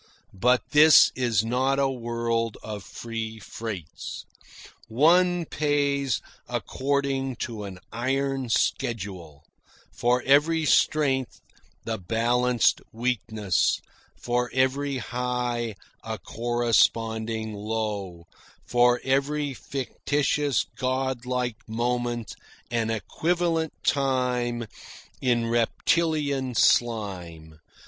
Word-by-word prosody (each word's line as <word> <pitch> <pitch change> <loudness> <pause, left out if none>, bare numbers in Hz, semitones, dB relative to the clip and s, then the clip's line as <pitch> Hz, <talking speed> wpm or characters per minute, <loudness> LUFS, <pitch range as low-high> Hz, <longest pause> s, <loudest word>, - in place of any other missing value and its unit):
But 125 +6 +3
this 155 +1 +8
is 115 -4 +1
not 130 +4 +1
a 140 -1 +3
world 115 -2 -2
of 105 -2 -6
free 115 0 -6
freights. 105 -6 -7 0.6
One 170 +8 +4
pays 140 -3 0 0.3
according 135 -1 -1
to 110 -3 -6
an 95 -2 -8
iron 135 +2 -1
schedule 95 -11 -2 0.5
for 125 +1 +1
every 155 +4 +4
strength 135 -5 +2 0.4
the 110 -2 -3
balanced 120 +5 +2
weakness; 110 -5 0 0.4
for 125 0 -1
every 135 +1 +1
high 125 -2 -2 0.3
a - - -4
corresponding 115 -1 0
low; 105 -5 -4 0.4
for 120 0 +3
every 140 +2 0
fictitious 140 +2 -1
god 130 -1 -1
like 125 -3 -1
moment 120 -1 -2 0.4
an 115 -1 0
equivalent 165 - 0
time 125 -4 0 0.6
in 120 -2 +2
reptilian 135 +3 +1
slime. 90 -11 0
120 Hz, 85 wpm, -26 LUFS, 115-135 Hz, 0.6 s, this